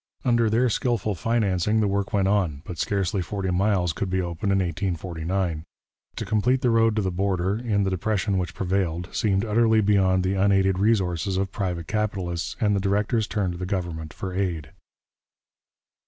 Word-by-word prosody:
Under 120 -2 +3
their 120 +4 +3
skilful 115 -2 0
financing 105 0 +1
the 105 - +2
work 100 0 -1
went 100 -3 +2
on, 90 -8 0
but 85 -3 -7
scarcely 95 0 0
forty 95 +1 -3
miles 90 -2 +1
could 95 +3 -3
be 95 +1 0
opened 90 +2 -2
in 95 - +3
1849. 85 -1 -2 0.5
To - - -4
complete 125 +5 +1
the 125 -3 +2
road 115 -1 +3
to 105 - 0
the 95 - -1
border, 95 +1 0
in 110 -4 0
the 95 - 0
depression 100 +1 0
which 90 -2 -4
prevailed, 90 -2 -1
seemed 100 -3 +1
utterly 110 0 +3
beyond 95 -3 +3
the 95 +1 0
unaided 95 -1 +2
resources 95 -4 +1
of 95 0 -1
private 90 -5 -3
capitalists, 95 -3 -2
and 105 -2 +2
the - - +1
directors 105 +3 0
turned 100 -4 -1
to 85 - -8
the 90 - -4
government 85 -5 -3
for 95 -1 -6
aid. 85 -7 -2
95 Hz, 175 wpm, -25 LUFS, 90-105 Hz, 0.5 s, Under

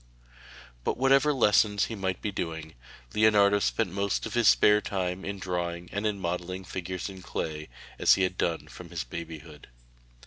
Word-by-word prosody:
But - - -1
whatever 135 +3 +4
lessons 105 -5 +3
he - - -6
might 95 -3 -3
be 105 - -1
doing, 80 -4 -5 0.4
Leonardo 105 -2 +5
spent - - 0
most 100 0 -1
of 110 - -6
his 120 -3 +3
spare 105 0 +6
time 95 -1 -3
in 100 0 -4
drawing 90 -2 -4
and 100 +2 -1
in 105 -2 -2
modelling 90 +1 -3
figures 95 -1 -5
in 95 -2 -9
clay, 75 -4 -4 0.3
as - - +6
he 95 - +1
had 90 0 0
done 85 -3 -1
from 90 -1 -11
his 85 -6 -4
babyhood. 80 +3 -9
95 Hz, 170 wpm, -28 LUFS, 85-105 Hz, 0.4 s, spare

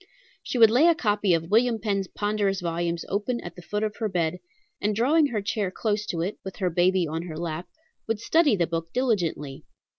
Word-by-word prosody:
"She - - -4
would 225 -2 +7
lay 270 +8 +5
a 340 - +5
copy 210 -6 +1
of 165 +2 -4
William 230 +1 +4
Penn's 200 -3 -1
ponderous 205 -2 -1
volumes 170 -1 -2
open 215 +5 -1
at 175 - -9
the 180 - -10
foot 210 +4 -3
of 215 0 -2
her 220 -2 -1
bed, 175 -1 -1 0.4
and 210 +1 0
drawing 290 +7 +3
her 215 -6 -3
chair 200 -1 -1
close 210 +2 -2
to 170 -4 -2
it, 190 +5 -3
with 190 -1 -7
her 185 -3 -1
baby 180 +1 +3
on 160 +2 -3
her 155 -2 -6
lap, 170 +1 -4 0.4
would 225 -1 -1
study 305 +1 +3
the 175 -3 +1
book 165 0 -4
diligently. 175 - -1
200 Hz, 210 wpm, -26 LUFS, 175-220 Hz, 0.4 s, would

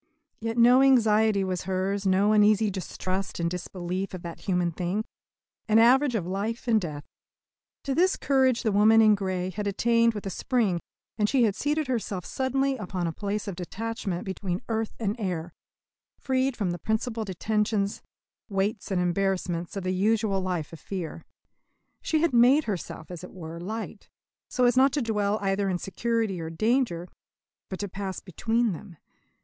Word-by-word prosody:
Yet 225 +1 -3
no 245 +2 +7
anxiety 220 -6 +4
was 185 -1 -3
hers, 195 +1 -1
no 195 +3 +3
uneasy 210 0 +4
distrust 185 0 -4
and 170 0 0
disbelief 180 +1 -4
of 180 - -9
that 170 -1 -7
human 180 -3 0
thing 180 +6 -2 0.6
an 220 -1 +4
average 250 +3 +5
of 190 -6 -1
life 205 +7 -3
and 225 -2 +4
death. 150 -4 -5 0.8
To 275 - -1
this 365 +6 +3
courage 260 -3 +2
the 220 - +1
woman 215 +2 +5
in 215 -1 +7
grey 185 -2 -2
had 205 +2 -4
attained 230 +3 +2
with 205 - -6
a 195 - -3
spring, 210 -4 0 0.4
and 210 0 +2
she 265 -3 +3
had 215 -3 +3
seated 300 +1 0
herself 220 -7 -3
suddenly 270 +1 0
upon 185 -4 -3
a 165 - -1
place 205 +2 -3
of 195 - -4
detachment 190 0 -4
between 190 0 -3
earth 225 -1 -2
and 210 -2 -1
air, 175 -4 -3 0.6
freed 260 -1 0
from 195 -5 0
the 175 - -4
principal 220 +3 -1
detentions, 210 +1 -1 0.5
weights, 200 +1 -1
and 190 -2 0
embarrassments 180 -1 -1
of 195 - -3
the 185 0 -1
usual 205 0 +1
life 180 -4 -3
of 165 - -9
fear. 165 +1 -6 0.8
She 315 -1 +1
had 335 - +2
made 250 +6 +6
herself, 180 - -5
as 175 -1 -8
it 180 - -10
were, 165 -2 -8
light, 215 +6 -6 0.4
so 250 - +2
as 245 - +4
not 265 +1 +5
to 295 - 0
dwell 210 -2 0
either 195 0 +1
in 180 - 0
security 220 0 -1
or 160 - -4
danger, 210 -1 0 0.6
but 190 - -4
to 205 - -2
pass 195 0 -5
between 225 +5 0
them. 175 0 -9
205 Hz, 170 wpm, -27 LUFS, 185-230 Hz, 0.8 s, no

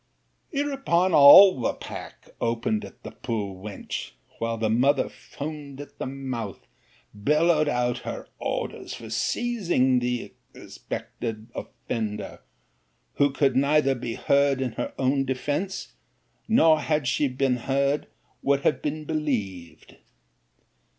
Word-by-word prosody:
'Hereupon 270 - +1
all 155 +4 +9
the - - 0
pack - - -10
opened 120 - 0
at - - -12
the - - -7
poor 105 -5 -4
wench, 105 -2 -6 0.3
while 115 0 -1
the 110 0 0
mother 130 +5 +3
foamed 145 -2 -8
at 145 0 -11
the - - -3
mouth, 130 -7 -5 0.5
bellowed 150 +8 +2
out 125 -2 0
her - - -6
orders - - -4
for 115 -1 -10
seizing 170 - +1
the 125 0 -3 0.2
suspected 110 0 -7
offender; 105 -3 -5 0.8
who 145 - +4
could 135 -2 +1
neither 140 0 +3
be 120 -2 -5
heard 140 -1 +2
in 130 -2 -1
her - - -4
own 135 +1 +1
defence, 145 +8 -3 0.5
nor 165 -9 +5
had 150 -2 0
she 145 +3 +2
been 130 -1 0
heard, 140 +3 0 0.3
would 140 0 +2
have 135 -2 +1
been 155 +1 -3
believed. 110 - -4
135 Hz, 125 wpm, -25 LUFS, 120-150 Hz, 0.8 s, all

